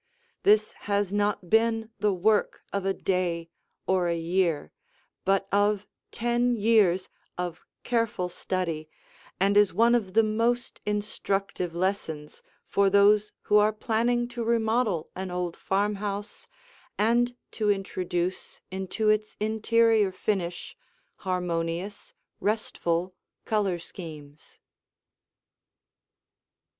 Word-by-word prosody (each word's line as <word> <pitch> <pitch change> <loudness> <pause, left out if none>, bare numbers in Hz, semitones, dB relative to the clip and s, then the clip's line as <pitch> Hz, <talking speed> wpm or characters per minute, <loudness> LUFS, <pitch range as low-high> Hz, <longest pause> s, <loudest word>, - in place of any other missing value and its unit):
This 215 +1 +4 0.2
has 200 -1 +1
not 205 -3 0
been 225 +1 +2
the 210 0 +2
work 205 +3 +1
of 200 -1 -1
a 195 - +2
day 170 -3 -1 0.3
or 185 -2 +2
a 170 0 0
year, 165 -2 0 0.5
but 195 0 +2
of 205 0 +2 0.2
ten 240 +1 +1
years 205 -5 +3 0.3
of 175 -1 -4 0.2
careful 230 -6 0
study 170 -3 -3 0.5
and 200 +2 +3
is 205 -3 +5
one 230 +3 +5
of 205 -5 0
the 225 - +6
most 230 +3 0
instructive 195 -4 -2
lessons 170 -5 -3 0.2
for 200 0 +3
those 205 +1 +5
who 210 - +3
are 210 +1 +5
planning 235 +3 0
to 240 -1 -4
remodel 225 -6 +1
an 190 0 -4
old 180 -1 -3
farmhouse 205 +1 -2 0.5
and 240 +3 +2 0.2
to 215 -2 0
introduce 185 -2 -2
into 190 +3 -1
its 215 0 +1
interior 220 -1 +3
finish 185 -2 -3 0.4
harmonious, 180 +1 -3 0.3
restful, 185 -4 -1 0.3
color 205 -5 +1
schemes. 155 -4 -10
200 Hz, 105 wpm, -27 LUFS, 180-215 Hz, 0.5 s, the